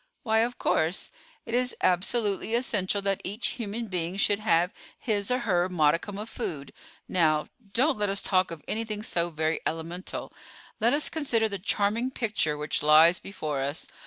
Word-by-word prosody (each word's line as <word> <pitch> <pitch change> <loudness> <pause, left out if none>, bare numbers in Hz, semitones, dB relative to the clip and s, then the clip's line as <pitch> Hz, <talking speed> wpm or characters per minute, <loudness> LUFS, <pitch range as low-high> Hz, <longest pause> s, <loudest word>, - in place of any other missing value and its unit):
"Why, 220 -2 +2
of 240 +2 0
course; 160 +4 +1 0.3
it 230 - -6
is 250 +1 +1
absolutely 200 +4 +1
essential 205 -5 0
that 195 -1 0
each 205 +5 -1
human 230 0 -4
being 180 -2 -3
should 200 +1 +2
have 180 -4 +2 0.2
his 205 -4 -1
or 250 - +2
her 185 -7 +1
modicum 165 +3 +1
of 210 +2 -5
food. 145 - -5 0.3
Now, 155 -4 +2 0.2
don't 260 +2 +2
let 205 -1 +1
us 195 0 0
talk 185 -1 +2
of 165 -4 -8
anything 215 -1 -2
so 170 -4 0
very 160 0 -1
elemental. 165 +3 -4 0.5
Let 235 +4 +3
us 295 +1 +3
consider 250 -8 +1
the 200 -2 -5
charming 210 +5 +1
picture 210 - -1
which 150 +1 -2
lies 155 +3 +6
before 155 -8 -4
us. 140 +3 -3
200 Hz, 165 wpm, -27 LUFS, 165-225 Hz, 0.5 s, lies